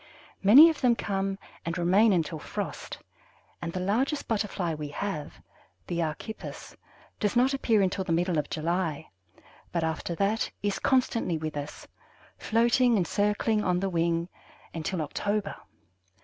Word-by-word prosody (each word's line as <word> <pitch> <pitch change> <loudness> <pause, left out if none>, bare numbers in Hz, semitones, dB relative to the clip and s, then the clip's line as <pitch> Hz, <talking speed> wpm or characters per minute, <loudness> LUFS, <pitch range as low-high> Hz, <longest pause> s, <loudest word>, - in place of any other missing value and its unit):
Many 250 +12 +9
of 315 - -8
them 245 -3 +4
come 195 -2 -2 0.3
and 170 +2 -3
remain 190 +6 +4
until 165 -3 0
frost, - - -5 0.6
and 170 - -3
the 185 - -4
largest 240 +11 0
Butterfly 200 -6 -1
we 150 -1 -5
have, 155 -1 -4 0.5
the 170 -1 -2
Archippus, 165 +7 -6 0.4
does 210 +1 0
not 255 +3 +4
appear 225 -6 +2
until 190 +1 0
the 175 - -4
middle 170 0 +1
of 145 - -3
July, 160 -1 -2 0.6
but 170 -2 -1
after 160 +1 -2
that 200 +4 0
is 200 -1 0
constantly 235 -9 +1
with 155 -1 -5
us, 145 0 -6 0.5
floating 235 +1 +3
and 180 - +1
circling 210 +1 +1
on 180 -1 +1
the 195 0 -1
wing, 170 0 0 0.5
until 165 +1 -2
October. 205 +7 -2
190 Hz, 145 wpm, -28 LUFS, 165-215 Hz, 0.6 s, Many